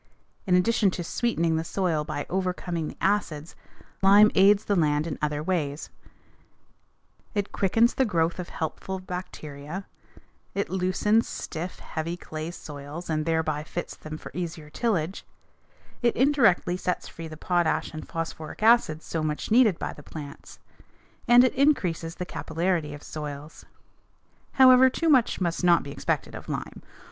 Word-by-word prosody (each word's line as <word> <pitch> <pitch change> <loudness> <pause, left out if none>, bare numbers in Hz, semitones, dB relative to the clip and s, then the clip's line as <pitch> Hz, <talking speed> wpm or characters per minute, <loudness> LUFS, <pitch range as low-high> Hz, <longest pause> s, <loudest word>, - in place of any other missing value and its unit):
In 180 - +4
addition 205 +2 +3
to 175 - -3
sweetening 170 -5 0
the 160 - -1
soil 165 -3 -1
by 150 -1 -4
overcoming 180 -3 -2
the - - -9
acids, 170 -6 -1 0.5
lime 205 +2 +7
aids 200 +2 +5
the 205 - +1
land 150 -3 +2
in 160 -4 -5
other 150 0 -1
ways: 155 -4 -2 1.4
it 205 -1 -1
quickens 225 +5 +3
the 265 - +2
growth 170 -6 0
of 180 - -5
helpful 175 +4 -4
bacteria; 180 -2 -7 0.7
it 200 -2 -2
loosens 190 +4 +2
stiff, 170 +3 -5
heavy 165 +2 -5
clay 155 -1 -6
soils 150 0 -8
and 155 0 -1
thereby 160 -2 0
fits - - -5
them 155 0 -8
for - - -10
easier 165 -4 -5
tillage; 190 -4 -1 0.8
it 240 -1 +2
indirectly 235 -10 +3
sets 180 -1 -2
free 165 -1 -8
the 155 -1 -9
potash 175 0 0
and 155 - -7
phosphoric 165 +1 -5
acid 220 -9 +4
so 165 - -3
much 155 +5 -3
needed 220 -6 +5
by - - -4
plants; 145 -3 -10 0.7
and 240 +1 +8
it 255 - +2
increases 180 - +1
the 180 - -4
capillarity 165 -3 -2
of 145 - -12
soils. 150 0 -7 0.9
However, 260 0 +7
too 330 +5 -1
much 260 -6 +4
must 175 -1 -1
not 175 -2 +5
be 140 - -7
expected - - -2
of - - -9
lime. - - -5
175 Hz, 150 wpm, -26 LUFS, 155-200 Hz, 1.4 s, and